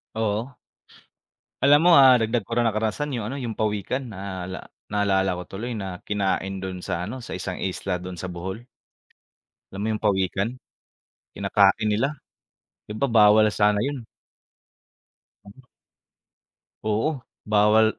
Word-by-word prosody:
Oo. 110 +4 -2 1.1
Alam 145 +5 +6
mo, - - +7
ah, 130 -3 +7
dagdag 110 -1 0
ko 115 - -6
ra 120 - +2
na 115 - +3
karanasan 110 +6 -2
yung 110 - -4
ano, - - -5
yung 115 -3 -5
pawikan. 110 +4 -2
Naala 95 -1 -6 0.2
naalala 95 -2 +2
ko 90 - -5
tuloy 120 +5 -5
na, 95 -4 -5
kinain 95 -1 -1
do'n 95 -1 -6
sa 90 -2 -2
ano, 130 - -5
sa 120 - -8
isang 95 0 -4
isla 95 0 -2
do'n 90 +1 -7
sa 90 +1 -6
Bohol. 95 +6 -6 1.1
Alam 95 - -6
mo - - -1
yung 110 0 -4
pawikan? 95 0 +1 0.8
Kinakain 100 +2 +3
nila. 120 +8 +1 0.7
'Di - - -11
ba, 140 - +2
bawal 110 -2 +6
sana 105 0 +2
yun. 135 +2 -2 2.8
Oo, 110 +6 +1 0.4
bawal 105 +1 +5
105 Hz, 135 wpm, -24 LUFS, 95-115 Hz, 2.8 s, mo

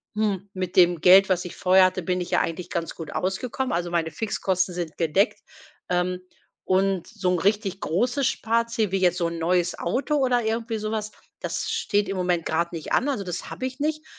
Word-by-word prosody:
„Hm, 200 -2 -1
mit 185 -1 -4
dem 175 -2 +5
Geld, 190 +2 +8
was 185 -2 +1
ich 180 - -8
vorher 185 0 +5
hatte, 185 0 0
bin 180 +1 -1
ich 175 - -5
ja - - +3
eigentlich 165 +2 -3
ganz 165 -1 -3
gut 160 -3 -7
ausgekommen, 245 +8 -2
also 175 0 -1
meine 165 -2 0
Fixkosten 185 -1 -1
sind 170 -3 -5
gedeckt. 175 +7 +1 0.5
Ähm, 180 0 0 0.5
und 190 -1 +1
so 200 -5 -1
'n 180 - +1
richtig 200 0 0
großes 245 - +1
Sparziel 230 -2 0
wie 195 - +1
jetzt 180 -1 +2
so 175 - 0
'n 170 0 -5
neues 175 +1 +1
Auto 275 - 0
oder 250 -3 +2
irgendwie 225 0 -2
sowas, 215 0 -3 0.3
das - - -3
steht 205 -1 0
im 195 - -3
Moment 180 -2 0
grad 170 +2 -1
nicht 160 - -6
an, 285 - +2
also 215 -8 -2
das 180 -1 -5
habe 255 - -5
ich 260 +2 -5
nicht.“ 310 +1 -2
185 Hz, 205 wpm, -25 LUFS, 175-220 Hz, 0.5 s, Geld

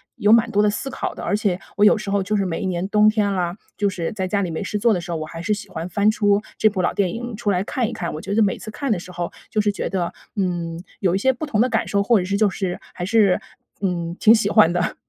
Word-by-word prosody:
有 210 +1 +2
蛮 230 0 +5
多 205 0 +3
的 210 - +4
思 235 +6 -3
考 270 - -4
的。 - - -8
而 - - 0
且 200 -4 0 0.2
我 205 - +2
有 210 - +6
时 205 -1 -5
候 200 -1 +1
就 210 +2 0
是 195 - 0
每 165 -2 -3
一 - - -2
年 180 0 -2
冬 210 +1 +5
天 210 -2 +1
啦， 180 -1 -2 0.2
就 205 -1 +1
是 175 -3 -4
在 190 -3 -2
家 200 +2 0
里 185 - -2
没 160 - -3
事 210 - -2
做 230 +1 +3
的 180 - -1
时 175 - -7
候， 165 - -1
我 155 - -4
还 165 +1 -8
是 210 +4 0
喜 205 0 -6
欢 165 -1 -5
翻 205 +2 +2
出 205 -2 +2 0.2
这 215 - +4
部 195 -3 -2
老 - - 0
电 190 -3 +1
影 240 0 -5
出 210 -1 -1
来 180 - +1
看 240 -4 -1
一 - - -6
看。 190 -7 -4
我 155 - -6
觉 200 - -4
得 225 - +3
每 200 -3 +2
次 215 - -8
看 275 +5 -4
的 200 - +1
时 180 - -10
候， 175 -1 -4 0.2
就 215 - -1
是 210 - +2
觉 200 - -4
得， 180 -3 -2 0.2
嗯， 175 -3 -2 0.2
有 180 -3 +2
一 190 - +2
些 265 +6 +2
不 260 +5 -5
同 220 -8 -1
的 250 - +4
感 - - 0
受， 200 0 +2
或 230 +1 +4
者 180 - -1
是 200 +2 0
就 215 -1 +3
是 185 -1 -3
还 175 - -4
是 205 -2 +3 0.4
嗯， 170 -3 -2
挺 220 - +7
喜 220 -3 +2
欢 210 -6 +5
的。 175 0 -1
200 Hz, 330 characters per minute, -22 LUFS, 180-215 Hz, 0.4 s, 挺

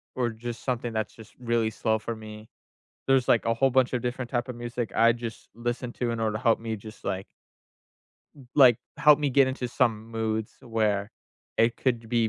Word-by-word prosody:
or 125 -2 +1
just 115 +1 -7
something 125 -2 -2
that's 110 -1 -2
just 110 - -14
really 115 -2 +1
slow 110 0 0
for 115 +2 -4
me. 110 0 -10 0.6
There's, 135 -2 +3
like, 115 - +4
a 115 - +3
whole 135 +3 +3
bunch 130 0 +3
of 125 - 0
different 125 0 -3
type 120 -1 -1
of 125 - -5
music 120 -1 -4
I 115 +1 +6
just 115 -1 -7
listen 120 +1 -3
to 120 -2 -1
in 115 - -3
order 110 -1 0
to 110 - -7
help 115 -3 +3
me 115 -1 -3
just, 110 +3 -12
like 95 0 -2 1.1
m 135 -3 -14
like, 130 -6 +7 0.2
help 150 -1 +7
me 145 -2 0
get 135 0 +5
into 130 -1 -3
some 115 -3 0
moods 110 -1 -2
where 110 -3 0 0.5
it 115 +1 +3
could 125 -3 0
be 115 -2 +2
115 Hz, 205 wpm, -27 LUFS, 110-125 Hz, 1.1 s, like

